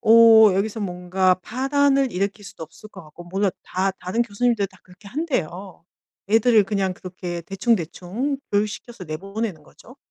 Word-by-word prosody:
어 225 -2 +7
여기서 215 +3 -1
뭔가 185 0 +1
파란을 275 +2 +1
일으킬 200 +3 -2
수도 165 - -10
없을 175 +7 -12
것 195 -3 -12
같고 170 +3 -13
몰라 195 +3 0
다 190 +2 -1
다른 185 +7 -1
교수님들 230 -1 0
다 185 -1 -21
그렇게 185 +3 -18
한대요. 195 - -4 0.5
애들을 225 -1 +5
그냥 195 -2 -1
그렇게 180 -2 -7
대충대충 195 - -2
교육시켜서 210 +1 -2
내보내는 195 +2 -5
거죠. 250 - -17
200 Hz, 345 characters per minute, -22 LUFS, 185-230 Hz, 0.5 s, 어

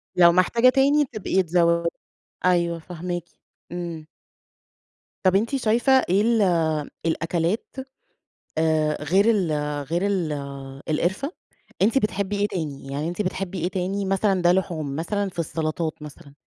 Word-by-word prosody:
لو 170 -1 +7
محتاجة 230 +8 +4
تاني 280 +3 +4
بتبقي 215 -6 0
تزوّد 170 0 +2 0.6
أيوه 170 -2 +2
فاهماكِ 175 0 -5 0.5
إمم. 170 -3 -5 1.2
طب 185 0 +4
أنتِ 225 +7 +1
شايفة 240 +1 +2 0.2
إيه 195 +3 +4
ال 230 0 +3 0.6
الأكلات 165 +4 -1 1.3
غير 185 +7 +3
ال 195 -8 +2 0.4
غير 170 +2 0
ال 180 -6 0 0.6
القرفة؟ 190 - 0 0.5
أنتِ 225 +7 +3
بتحبي 205 -4 0
إيه 205 - +2
تاني، 155 -9 -5
يعني 145 +3 -2
أنتِ 175 - -3
بتحبي 185 -1 -3
إيه 175 - +1
تاني؟ 190 +2 -2
مثلًا 195 0 +1
ده 175 0 +5
لحوم 160 -6 -1
مثلًا 200 +5 -1
في 175 - -9
السلطات 160 -1 -2
مثلًا، 145 -1 -11
180 Hz, 130 wpm, -24 LUFS, 165-205 Hz, 1.3 s, لو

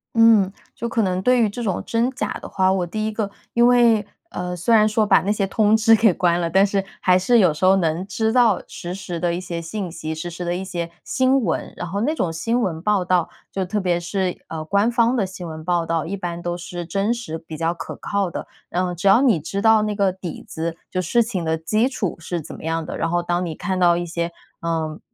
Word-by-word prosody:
嗯， 225 -4 +5 0.2
就 235 - -4
可 230 - +1
能 185 -1 0
对 250 +4 +3
于 220 - +3
这 240 +4 -5
种 195 -5 -1
真 235 +3 +1
假 265 - -3
的 - - -8
话， 190 -1 +2
我 190 -2 0
第 215 +5 -3
一 - - -2
个 210 -2 -2 0.2
因 235 0 +4
为， 235 -3 +4 0.3
呃， 180 0 -4
虽 225 +7 +3
然 215 -1 +5
说 215 0 +2
把 - - +5
那 200 - 0
些 200 -2 0
通 210 +2 +3
知 225 +1 +6
给 220 -3 +4
关 175 -1 +2
了， 170 - -1
但 195 +3 +4
是 195 -1 0 0.2
还 180 -1 +4
是 230 +6 +3
有 180 -7 +4
时 150 - -8
候 190 +1 +6
能 170 0 0
知 220 +3 -1
道 240 -6 +4
实 175 +1 -6
时 180 -3 -6
的 175 -1 +1
一 175 - -2
些 175 -2 -5
信 185 +3 -4
息、 160 -1 -5
实 160 +2 -5
时 175 +1 -6
的 175 0 -1
一 185 +2 -4
些 170 -3 -4
新 260 +1 +2
闻。 175 -8 -2
然 175 - -4
后 200 +4 -3
那 290 +7 +1
种 175 - -1
新 230 +9 0
闻 165 -7 -2
报 205 -2 +1
道， 180 -2 +2 0.2
就 195 - -1
特 200 +3 -2
别 180 -3 +1
是， 180 +1 -2
呃， 160 -1 -5
官 200 +7 +2
方 235 +1 +3
的 220 -6 +1
新 185 -2 -8
闻 160 -1 -7
报 175 0 0
道， 165 -1 -1
一 200 +4 -4
般 175 -2 -5
都 175 0 -3
是 175 0 -6
真 195 +6 0
实 235 -10 -5
比 160 -1 -9
较 165 +2 0
可 170 - -7
靠 200 -2 -1
的。 - - -6 0.2
呃， 180 0 0
只 175 +3 -2
要 195 +6 +6
你 235 - +4
知 195 +6 -4
道 220 0 +5
那 210 -1 -1
个 200 -2 +2
底 180 -3 -7
子， 165 +1 -4
就 185 - -1
事 235 +7 +2
情 195 -7 -3
的 160 0 0
基 215 +10 +1
础 215 -8 -3
是 170 +1 -4
怎 155 - -10
么 - - -11
样 165 0 -1
的， - - -5
然 165 - -1
后 175 +1 0
当 175 +1 -1
你 165 -2 -4
看 190 +2 -2
到 175 -1 +5
一 175 0 -2
些， 170 0 -3 0.3
呃， 160 -2 -2
185 Hz, 275 characters per minute, -22 LUFS, 170-215 Hz, 0.3 s, 知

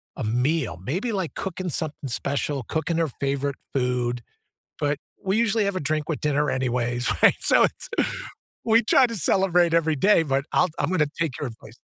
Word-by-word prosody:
a - - -5
meal. 125 - 0
Maybe 185 - -2
like 190 -6 -3
cooking 185 -1 -4
something 150 -3 -4
special, 140 +1 -2
cooking 160 +6 -2
her 165 -1 +2
favorite 140 +1 -2 0.2
food, 125 -2 0 0.6
but 145 0 0 0.3
we 190 +2 +1
usually 225 -2 +2
have 200 -1 -1
a - - -1
drink 155 +1 -1
with 160 - -2
dinner 150 -1 +1
anyways, 125 -1 0
right? - - +7
So - - +4
it's, - - -2 0.8
we 225 +1 +5
try 250 +3 +5
to 230 - -5
celebrate 175 -2 +2
every 160 -2 +2
day, 190 +1 +4
but 135 -1 0
I'll 180 - +3
I'm - - 0
gonna 155 -5 +2
take 160 -7 -1
your 145 - -2
advice. 110 0 -14
150 Hz, 180 wpm, -24 LUFS, 130-180 Hz, 0.8 s, right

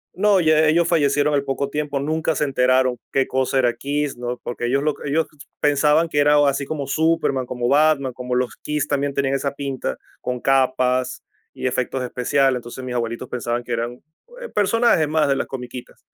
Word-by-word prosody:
No, 200 0 +3
ya 155 -1 +4
ellos 170 +2 +3
fallecieron 145 -2 +2
al 140 - +1
poco 140 0 -2
tiempo, 145 -1 -2
nunca 155 +2 -1
se 150 - 0
enteraron 130 -2 +2
qué 135 -1 +1
cosa 130 0 0
era 120 -2 +2
KISS, 145 -1 -2
¿no? 120 0 -4
Porque 120 0 -4
ellos 135 +3 +1
lo 150 -1 0
ellos 155 +3 +1 0.3
pensaban 150 +3 +3
que 145 - -4
era 145 0 +5
o 145 - +4
así 140 0 0
como 145 -3 -4
Superman, 155 -4 +1
como 120 -1 -3
Batman. 140 -1 +3
como 125 0 -5
los 125 -1 -1
KISS 150 -1 -2
también 140 -1 -1
tenían 135 -1 0
esa 140 0 -2
pinta 135 - -4 0.2
con 125 0 -3
capas 130 -1 +1 0.3
y 130 - -3
efectos 130 +1 -2
especiales, 130 +2 +1
entonces 120 +2 -8
mis 125 -1 -5
abuelitos 115 +1 -3
pensaban 120 0 -2
que 120 - -9
eran, 120 +1 -3 0.4
eh, 485 - -6
personajes 210 -6 +3
más 155 -1 +2
de 135 - +2
las - - -2
comiquitas. 125 -1 -8
135 Hz, 195 wpm, -21 LUFS, 125-150 Hz, 0.4 s, era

